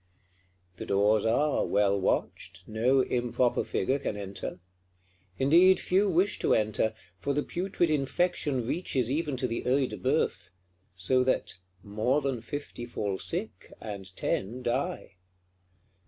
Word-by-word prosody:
The -, -, -6 dB
doors 105 Hz, +2 st, +3 dB
are 145 Hz, +6 st, +2 dB
well 100 Hz, -1 st, +2 dB
watched, 90 Hz, -1 st, -2 dB
no 120 Hz, +5 st, +2 dB
improper 125 Hz, 0 st, 0 dB
figure 130 Hz, +9 st, 0 dB
can 105 Hz, -, -3 dB
enter. 95 Hz, -2 st, -6 dB, 0.8 s
Indeed, 170 Hz, +8 st, +5 dB
few 195 Hz, +3 st, +2 dB
wish 185 Hz, +2 st, +1 dB
to -, -, +3 dB
enter; 110 Hz, 0 st, 0 dB, 0.2 s
for 140 Hz, -, -1 dB
the 145 Hz, -, +1 dB
putrid 175 Hz, -2 st, -1 dB
infection 145 Hz, -3 st, 0 dB
reaches 130 Hz, -4 st, -1 dB
even 150 Hz, -2 st, -1 dB
to 125 Hz, -, -1 dB
the 115 Hz, -1 st, -3 dB
Œil 130 Hz, +1 st, +2 dB
de -, -, -7 dB
Bœuf; 130 Hz, -8 st, 0 dB, 0.5 s
so 125 Hz, +8 st, +3 dB
that 130 Hz, -, -1 dB, 0.2 s
"more 110 Hz, +7 st, +1 dB
than 135 Hz, -5 st, -2 dB
fifty 145 Hz, -2 st, -6 dB
fall 100 Hz, -5 st, -3 dB
sick, 185 Hz, +6 st, -4 dB
and 95 Hz, -3 st, -8 dB
ten 120 Hz, +6 st, -2 dB
die." 120 Hz, -6 st, -2 dB
125 Hz, 135 wpm, -28 LUFS, 105-145 Hz, 0.8 s, Indeed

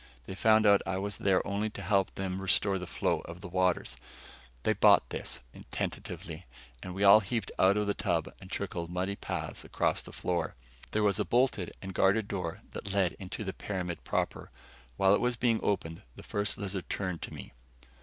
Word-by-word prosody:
They 95 Hz, -, -6 dB
found 110 Hz, +3 st, +4 dB
out 100 Hz, -1 st, +6 dB
I 95 Hz, 0 st, -2 dB
was 100 Hz, +1 st, -3 dB
there 95 Hz, -2 st, +2 dB
only 100 Hz, +2 st, -1 dB
to 100 Hz, -, -7 dB
help 95 Hz, 0 st, +2 dB
them 95 Hz, 0 st, -3 dB
restore 95 Hz, 0 st, +2 dB
the 90 Hz, -, -6 dB
flow -, -, 0 dB
of 85 Hz, +2 st, -9 dB
the 95 Hz, -, -6 dB
waters. 90 Hz, 0 st, 0 dB, 0.7 s
They -, -, +3 dB
bought -, -, +6 dB
this, 70 Hz, -, -4 dB, 0.3 s
tentatively, -, -, -5 dB, 0.3 s
and 90 Hz, -1 st, -6 dB
we 100 Hz, -, -1 dB
all 100 Hz, +2 st, +9 dB
heaved 110 Hz, 0 st, -3 dB
out 95 Hz, +2 st, +5 dB
of 105 Hz, -, +1 dB
the 100 Hz, -, +1 dB
tub 85 Hz, -5 st, -1 dB
and 95 Hz, -, -11 dB
trickled 90 Hz, -4 st, -3 dB
muddy 90 Hz, +3 st, -1 dB
paths -, -, -4 dB
across -, -, 0 dB
the -, -, -12 dB
floor. 85 Hz, -4 st, -2 dB, 0.3 s
There 110 Hz, -, +1 dB
was 100 Hz, -2 st, +3 dB
a -, -, +3 dB
bolted 120 Hz, -7 st, +1 dB
and 95 Hz, 0 st, -5 dB
guarded 100 Hz, +3 st, +3 dB
door 90 Hz, -5 st, -4 dB
that 100 Hz, -, -5 dB
led 95 Hz, -3 st, +2 dB
into 95 Hz, +3 st, -5 dB
the 95 Hz, -2 st, -3 dB
pyramid 90 Hz, -4 st, -4 dB
proper. -, -, -2 dB, 0.5 s
While 95 Hz, 0 st, +5 dB
it -, -, +3 dB
was 125 Hz, 0 st, +1 dB
being 115 Hz, -2 st, +2 dB
opened, 80 Hz, -5 st, -1 dB
the -, -, -11 dB
First 105 Hz, 0 st, -1 dB
Lizard 95 Hz, -2 st, -4 dB
turned 90 Hz, -4 st, -2 dB
to -, -, -6 dB
me. -, -, -9 dB
95 Hz, 195 wpm, -31 LUFS, 90-100 Hz, 0.7 s, all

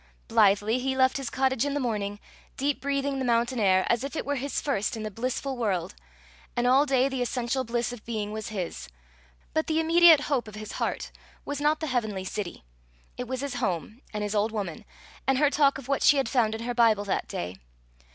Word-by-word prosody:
Blithely 205 Hz, -, +3 dB
he 265 Hz, +1 st, -1 dB
left 260 Hz, 0 st, +4 dB
his 275 Hz, -3 st, -4 dB
cottage 265 Hz, -2 st, +1 dB
in 285 Hz, 0 st, -1 dB
the -, -, +1 dB
morning, 205 Hz, -5 st, -2 dB, 0.4 s
deep 280 Hz, +1 st, 0 dB
breathing 280 Hz, 0 st, -1 dB
the -, -, -1 dB
mountain 240 Hz, 0 st, +1 dB
air, 190 Hz, -3 st, +4 dB
as 235 Hz, +1 st, +1 dB
if 280 Hz, +3 st, -5 dB
it -, -, -3 dB
were 285 Hz, 0 st, -1 dB
his 275 Hz, +2 st, -2 dB
first 245 Hz, -4 st, -1 dB
in 220 Hz, -, -5 dB
the 215 Hz, -, -4 dB
blissful 255 Hz, +4 st, -3 dB
world; 205 Hz, -8 st, -1 dB, 0.6 s
and 240 Hz, -, +1 dB
all 265 Hz, +4 st, +5 dB
day 265 Hz, -1 st, +3 dB
the 265 Hz, -2 st, -3 dB
essential 245 Hz, +1 st, -1 dB
bliss 240 Hz, 0 st, -2 dB
of 240 Hz, -, -10 dB
being 215 Hz, -3 st, -3 dB
was 215 Hz, 0 st, -5 dB
his; 180 Hz, -, -5 dB, 0.6 s
but 315 Hz, -, 0 dB
the 315 Hz, 0 st, +1 dB
immediate 330 Hz, -1 st, +7 dB
hope 275 Hz, -6 st, -1 dB
of 215 Hz, -, -10 dB
his 215 Hz, 0 st, -7 dB
heart -, -, -3 dB, 0.3 s
was 285 Hz, 0 st, -4 dB
not 300 Hz, +2 st, +2 dB
the -, -, -1 dB
heavenly 220 Hz, -8 st, -2 dB
city; 190 Hz, -, -5 dB, 0.5 s
it 250 Hz, -, -5 dB
was 260 Hz, +1 st, -3 dB
his 280 Hz, -2 st, -3 dB
home 210 Hz, -, -2 dB
and 210 Hz, -1 st, -3 dB
his 205 Hz, 0 st, -2 dB
old 215 Hz, +1 st, +1 dB
woman, 200 Hz, -7 st, -4 dB, 0.4 s
and 270 Hz, -1 st, +3 dB
her 290 Hz, +1 st, +3 dB
talk 285 Hz, -2 st, +3 dB
of 270 Hz, -2 st, -10 dB
what 275 Hz, 0 st, 0 dB
she 290 Hz, -, +6 dB
had 270 Hz, -, +1 dB
found 225 Hz, -5 st, +2 dB
in 225 Hz, -, -6 dB
her 245 Hz, +1 st, -2 dB
Bible 225 Hz, -4 st, +4 dB
that 200 Hz, -, -1 dB
day. 90 Hz, +2 st, -5 dB
245 Hz, 220 wpm, -27 LUFS, 215-275 Hz, 0.6 s, immediate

